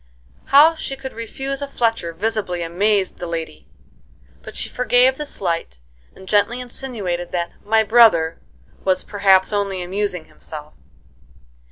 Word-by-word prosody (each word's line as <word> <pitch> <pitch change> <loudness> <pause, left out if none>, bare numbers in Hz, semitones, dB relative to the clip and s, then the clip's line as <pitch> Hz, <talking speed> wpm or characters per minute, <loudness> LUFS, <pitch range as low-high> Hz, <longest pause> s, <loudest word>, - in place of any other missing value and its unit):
How 300 +4 +7
she 300 -4 -5
could 265 -1 -8
refuse 270 +5 -5
a 285 - -3
Fletcher 225 -10 -1
visibly 185 -1 -2
amazed 190 +3 0
the 175 - -5
lady; 165 -1 -6 0.7
but - - -10
she - - -1
forgave 250 +1 +3
the 300 - -4
slight, 170 - -3 0.4
and 190 - -14
gently 205 +5 +2
insinuated 220 -9 -4
that 170 -1 -2
"my 220 +1 +3
brother" 210 -8 +5 0.4
was, 185 -1 +1
perhaps, 195 -1 +3
only 195 -3 -1
amusing 185 -2 -2
himself. 150 -1 -10
205 Hz, 135 wpm, -20 LUFS, 175-240 Hz, 0.7 s, How